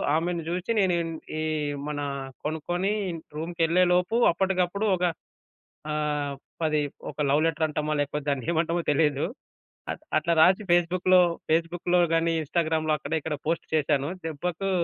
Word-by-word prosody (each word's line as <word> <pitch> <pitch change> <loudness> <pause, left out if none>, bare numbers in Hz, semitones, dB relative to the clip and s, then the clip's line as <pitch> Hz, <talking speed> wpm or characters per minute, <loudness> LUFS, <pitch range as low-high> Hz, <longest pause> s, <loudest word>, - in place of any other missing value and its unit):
ఆమెను 170 +1 0
జూచి 180 +5 -2
నేను 190 -3 +3 0.5
ఈ - - -1 0.5
మన 150 -1 -3 0.5
కొనుక్కొని 175 +5 -1 0.4
రూమ్‌కెళ్ళేలోపు 175 +4 +2 0.2
అప్పటికప్పుడు 190 +2 0
ఒక 180 - -4 0.9
ఆహ్, 150 -2 -1 0.3
10 155 -1 +2 0.3
ఒక - - -23
లవ్ 145 +2 +3
లెటర్ 160 -1 +1
అంటామో 150 0 -2
లేకపోతే 145 0 -2
దాన్నేమంటామో 165 +5 0
తెలీదు. 145 -1 +2 0.7
అ - - +1 0.3
అట్లా 170 +2 0
రాసి 185 +5 +5
ఫేస్‌బుక్‌లో 180 +1 +4 0.3
ఫేస్‌బుక్‌లో 175 +2 +2
గాని, 165 0 +2
ఇన్స్‌టాగ్రామ్‌లో 155 0 0
అక్కడ 140 - -8
ఇక్కడ 150 0 -3
పోస్ట్ 165 0 -1
చేసాను. 145 -1 +1 0.2
దెబ్బకు 175 +5 -3
165 Hz, 120 wpm, -26 LUFS, 150-180 Hz, 0.9 s, రాసి